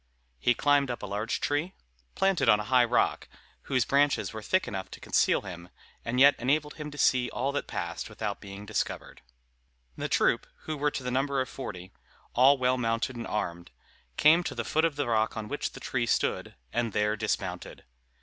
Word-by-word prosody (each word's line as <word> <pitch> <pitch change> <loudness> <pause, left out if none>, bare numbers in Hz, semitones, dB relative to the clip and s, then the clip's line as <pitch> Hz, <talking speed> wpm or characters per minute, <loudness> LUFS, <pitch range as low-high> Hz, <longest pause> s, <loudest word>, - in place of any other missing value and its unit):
He 120 - +3
climbed 145 -2 +3
up 120 - -4
a - - -2
large 105 +3 -2
tree, 150 +6 -1 0.4
planted 195 -10 +2
on 105 -1 +6
a - - -2
high 125 +2 +4
rock, 120 0 +1 0.4
whose 130 -3 +1
branches 140 -2 +2
were 110 - -6
thick 185 - +1
enough 95 -2 -5
to - - -10
conceal - - +2
him, 85 -3 -9 0.3
and 125 +2 -1
yet 140 +2 +8
enabled 150 +4 0
him 150 -1 -5
to 145 - -11
see 125 -3 +3
all 130 +5 -1
that 145 - -3
passed - - -4
without - - -4
being 100 +1 -9
discovered. 105 0 -4 0.7
The - - -4
troop, - - +2
who 155 - -4
were 150 0 +1
to 135 - -5
the 125 - -2
number 135 +2 0
of 130 - -1
forty, 95 -8 -7 0.4
all 135 +3 +6
well 130 0 +1
mounted 115 +2 -1
and 120 - -5
armed, 85 -5 -3 0.5
came 165 +3 +6
to - - -3
the - - -3
foot 160 +1 +2
of 160 -3 0
the 145 - -1
rock 110 -1 +1
on 110 -1 -4
which 145 - -3
the - - -9
tree 120 -2 -2
stood, - - 0 0.2
and 115 -3 -1
there 105 +1 +1
dismounted. 95 -5 -3
125 Hz, 200 wpm, -28 LUFS, 110-145 Hz, 0.7 s, yet